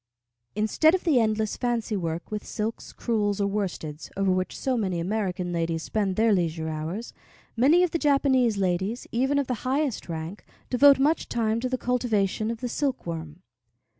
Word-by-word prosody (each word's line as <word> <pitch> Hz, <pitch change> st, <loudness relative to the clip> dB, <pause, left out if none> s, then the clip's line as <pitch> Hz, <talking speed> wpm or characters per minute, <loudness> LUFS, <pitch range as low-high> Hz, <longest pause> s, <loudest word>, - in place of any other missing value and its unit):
Instead 220 Hz, -, +3 dB
of 375 Hz, -, -3 dB
the 305 Hz, -8 st, +4 dB
endless 215 Hz, -1 st, 0 dB
fancy 235 Hz, -3 st, -1 dB
work 170 Hz, -1 st, -3 dB
with 210 Hz, -1 st, -3 dB
silks, 220 Hz, +2 st, -4 dB
crewels, 210 Hz, -3 st, -1 dB
or 200 Hz, -, +2 dB
worsteds, 180 Hz, -7 st, -4 dB
over 195 Hz, -1 st, +2 dB
which 185 Hz, 0 st, -1 dB
so 260 Hz, -1 st, 0 dB
many 190 Hz, -7 st, -1 dB
American 180 Hz, -1 st, -2 dB
ladies 165 Hz, -1 st, -1 dB
spend 200 Hz, -4 st, -1 dB
their 220 Hz, +1 st, +4 dB
leisure 165 Hz, -3 st, -1 dB
hours, 160 Hz, +9 st, -5 dB, 0.4 s
many 290 Hz, +10 st, +5 dB
of 360 Hz, -, +1 dB
the 335 Hz, -, -1 dB
Japanese 265 Hz, -6 st, +3 dB
ladies, 190 Hz, +4 st, -1 dB
even 265 Hz, +4 st, +1 dB
of 285 Hz, -, +1 dB
the 255 Hz, -, -2 dB
highest 265 Hz, -, -1 dB
rank, 165 Hz, +4 st, -5 dB, 0.3 s
devote 280 Hz, +2 st, +7 dB
much 300 Hz, +4 st, +1 dB
time 225 Hz, -1 st, 0 dB
to 255 Hz, +2 st, -2 dB
the 255 Hz, -, -1 dB
cultivation 225 Hz, -4 st, 0 dB
of 230 Hz, -1 st, -4 dB
the 250 Hz, -, -1 dB
silkworm. 170 Hz, -, -3 dB
215 Hz, 170 wpm, -26 LUFS, 185-250 Hz, 0.4 s, devote